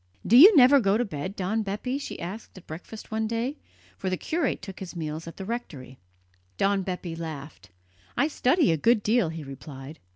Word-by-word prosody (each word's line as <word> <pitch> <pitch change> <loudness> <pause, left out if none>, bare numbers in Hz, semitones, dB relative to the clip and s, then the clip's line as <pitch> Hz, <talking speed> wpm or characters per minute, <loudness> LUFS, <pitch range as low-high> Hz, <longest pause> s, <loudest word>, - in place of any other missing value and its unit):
"Do 225 - +4
you 365 - +10
never 270 +2 +8
go 200 -3 +2
to 245 - 0
bed, 185 +1 -5
Don 200 +4 -1
Bepi?" 215 +7 -3
she 280 - -7
asked 195 +4 -7
at 185 - -13
breakfast 175 +9 -10
one 220 0 -1
day, 235 +6 -2 0.4
for 190 - -2
the 185 - -1
curate 315 - -1
took 195 -3 -8
his 185 -2 -8
meals 160 0 -5
at 165 - -9
the 195 - -6
rectory. 150 - -6 0.6
Don 195 0 +2
Bepi 180 -2 -5
laughed. 150 - -8 0.5
"I 290 - +3
study 300 - +2
a 160 - +1
good 225 +6 +3
deal," 220 -5 +2
he 160 -1 -6
replied. 135 +1 -10
195 Hz, 195 wpm, -26 LUFS, 165-235 Hz, 0.6 s, you